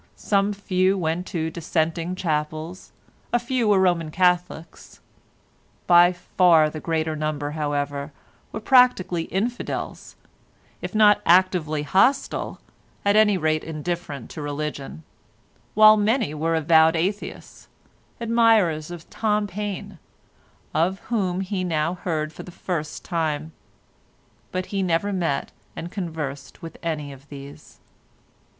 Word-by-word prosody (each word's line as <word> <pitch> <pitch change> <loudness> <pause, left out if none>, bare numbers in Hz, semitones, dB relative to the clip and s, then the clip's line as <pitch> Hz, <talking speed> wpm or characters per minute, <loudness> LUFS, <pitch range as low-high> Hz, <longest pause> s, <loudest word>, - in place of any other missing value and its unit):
Some 200 0 +1
few 190 -1 +1
went 170 +1 -2
to 160 -3 -2
dissenting 165 +1 -1
chapels, 155 0 -3 0.4
a 240 - +4
few 240 -1 -1
were 205 -2 +4
Roman 175 -4 +2
Catholics; 180 -1 -1 0.9
by 175 0 +6
far 175 -3 +3
the 155 - -6
greater 160 -1 -1
number, 150 -1 -3
however, 145 -1 -3 0.4
were 215 - -5
practically 220 -9 +4
infidels, 235 +6 -4 0.7
if - - -6
not 210 -1 +5
actively 170 -4 +3
hostile, 195 - +1 0.5
at 200 0 +4
any 210 -2 +5
rate 155 -2 0
indifferent 160 -4 -5
to 155 - -7
religion, 145 - -5 0.7
while 215 0 +8
many 215 - +1
were 165 +2 0
avowed 160 +1 +4
Atheists—admirers 205 0 -1
of 175 -2 -9
Tom 210 -1 0
Paine, 200 -1 -5 0.7
of 175 +5 +1 0.2
whom 190 -4 0
he 190 -1 -3
now 165 -1 0
heard 160 -4 -3
for - - -9
the - - -11
first 165 -3 -5
time; 160 -3 -2 1.0
but 185 0 -2
he 195 - 0
never 185 +3 0
met 170 -7 -1 0.2
and 170 - -6
conversed 150 - -6
with 165 - -8
any 150 -4 -3
of 135 +1 -17
these. 140 0 -11
170 Hz, 120 wpm, -23 LUFS, 155-195 Hz, 1.0 s, while